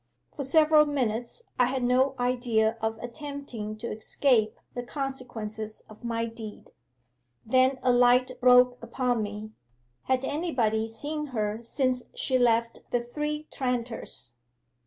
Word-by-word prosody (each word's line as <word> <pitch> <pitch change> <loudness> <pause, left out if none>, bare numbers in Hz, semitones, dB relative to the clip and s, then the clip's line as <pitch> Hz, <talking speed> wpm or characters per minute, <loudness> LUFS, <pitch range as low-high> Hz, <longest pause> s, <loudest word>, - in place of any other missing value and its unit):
For 285 - -3
several 305 +2 +5
minutes 245 - -2 0.2
I 250 - +6
had 255 0 -1
no 260 +2 +3
idea 240 -3 +1
of 220 0 -1
attempting 245 -5 -6
to 235 +2 -5
escape 220 0 +1
the 245 - -3
consequences 240 -5 -5
of 215 +1 -15
my 230 -1 -1
deed. 225 -2 -9 0.7
Then 255 +3 +3
a 255 - +4
light 245 +1 +5
broke 250 0 +6
upon 250 -3 0
me. 210 +1 -5 0.5
Had 260 0 +1
anybody 245 -9 0
seen 295 +7 -4
her 210 +1 -1
since 255 +1 0
she 260 -1 +1
left 230 -1 +2
the 240 -1 0
Three 300 +5 -3
Tranters? 245 - -3
245 Hz, 130 wpm, -28 LUFS, 225-265 Hz, 0.7 s, I